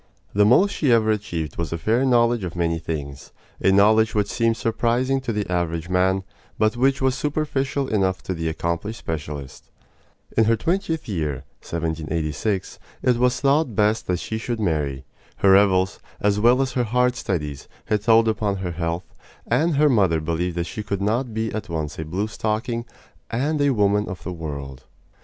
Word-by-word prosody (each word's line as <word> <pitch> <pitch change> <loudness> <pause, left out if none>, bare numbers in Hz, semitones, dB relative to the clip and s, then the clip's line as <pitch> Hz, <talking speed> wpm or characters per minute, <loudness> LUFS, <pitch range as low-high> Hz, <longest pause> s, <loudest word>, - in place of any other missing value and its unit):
The 105 +1 +4
most 190 - +5
she 140 -5 +1
ever 110 -2 +4
achieved 85 -8 -3
was 85 -3 -3
a 85 - -1
fair 110 +10 +1
knowledge 120 -3 +3
of 90 -1 -5
many 85 -1 0
things 70 -4 -6 0.3
a 95 - +5
knowledge 110 +3 +4
which 105 -1 +1
seemed 115 -1 +1
surprising 125 +4 0
to 130 - -3
the 105 -1 -2
average 85 -1 -2
man, 95 +1 +2 0.3
but 110 +2 +2
which 135 +2 +2
was 130 -1 +3
superficial 140 -1 -1
enough 95 -4 0
to 95 - -3
the 80 -2 -2
accomplished 85 +7 -3
specialist. 75 -6 -6 0.7
In 110 - +4
her 115 +1 +4
twentieth 165 - -1
year 75 - -2 0.2
(1786) 80 +4 -2 0.2
it 125 -2 +3
was 125 +1 +2
thought 140 -4 +2
best 105 +2 +2
that 90 - +1
she 110 +5 -4
should 120 0 -3
marry. 75 -8 -1 0.3
Her 100 - +4
revels, 95 -1 +4 0.2
as 105 0 +1
well 120 +4 +4
as 135 - -3
her 125 0 0
hard 125 +2 +2
studies, 75 - -3 0.2
had 105 -1 0
told 115 +1 +5
upon 105 -2 0
her 95 -2 -4
health, 85 +1 -4 0.3
and 165 0 +1
her 150 +2 +4
mother 95 - +3
believed 85 +2 -2
that 85 - +1
she 105 - -5
could 100 -1 -3
not 115 +4 0
be 110 0 -2
at 110 -3 -5
once 80 -3 -4
a 80 - -3
blue 95 +7 -2
stocking 115 +3 -2 0.4
and 145 +6 0
a 145 - +4
woman 105 -4 +2
of 95 - -7
the 90 - -4
world. 70 -5 -7
105 Hz, 180 wpm, -23 LUFS, 85-120 Hz, 0.7 s, most